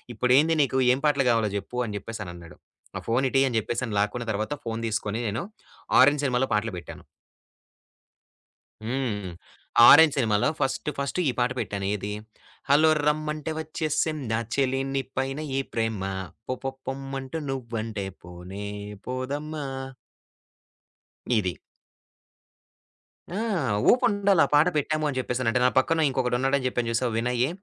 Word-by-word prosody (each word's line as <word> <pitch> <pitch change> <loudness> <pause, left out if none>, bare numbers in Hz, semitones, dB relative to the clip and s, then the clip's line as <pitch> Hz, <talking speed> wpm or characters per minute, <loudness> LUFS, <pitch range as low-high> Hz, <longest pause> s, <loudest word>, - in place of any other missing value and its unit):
"ఇప్పుడేంది 135 +8 +4
నీకు 130 -1 +1
ఏం 130 - -2
పాటలు 140 -2 +3
గావాలో 115 -2 +2
జెప్పు" 100 +4 -5
అని 105 -2 -5
జెప్పేసనన్నాడు. 90 -7 -8 0.4
ఆ - - -3
ఫోనిటీ 130 +3 +2
అని 120 - -1
జెప్పేసని 115 0 -3
లాక్కున్న 115 +4 -1
తరువాత 110 +6 -2
ఫోను 115 0 -3
తీసుకొని 110 0 -2
నేను 105 +3 -2 0.6
'ఆరెంజ్' 145 +2 +5
సినిమాలో 130 0 +1
పాటలు 105 0 0
బెట్టాను. 85 - -10 1.8
హ్మ్. 115 - -3 0.3
హ్మ్. 90 - -6 0.6
ఆరెంజ్ 160 -1 +9
సినిమాలో 110 -5 +2
ఫస్ట్ 135 - -1
ఫస్టు 140 +5 -2
ఈ - - +2
పాట 120 +1 +2
పెట్టాను 100 -3 -3
ఏది, 105 0 -5 0.6
హల్లో 150 +3 +6 0.2
రమ్మంటే 155 +1 -1
ఒచ్చేసిందా 155 -6 -1 0.2
చెలి 135 -1 +1
నీ 135 - +1 0.2
పైన 135 +1 -1 0.2
ఈ - - +2
ప్రేమ. 110 -3 -1 0.5
పొపొ 135 +1 -3 0.2
పొమ్మంటు 135 +2 -4
నువ్వంటే 115 -5 -4 0.2
పోనే 90 +3 -8 0.4
పోదమ్మా! 145 +4 -4 1.7
ఇది. 95 -3 +1 1.9
ఆ! - - -1 0.5
ఊపుండాలా 205 -7 +3
పాట 150 +3 +6
బెట్టాము 155 +1 0
అని 140 -3 -3
జెప్పేసనంటే. 125 -1 0
నా - - +6
పక్కన 160 +4 +3
ఇంకొకడున్నాడు 130 +1 +1
అని 130 - -4
జెప్పాను 120 -2 -1
చూశావా 120 +1 0
వినయ్యి, 125 +2 +1
130 Hz, 125 wpm, -26 LUFS, 110-140 Hz, 1.9 s, ఆరెంజ్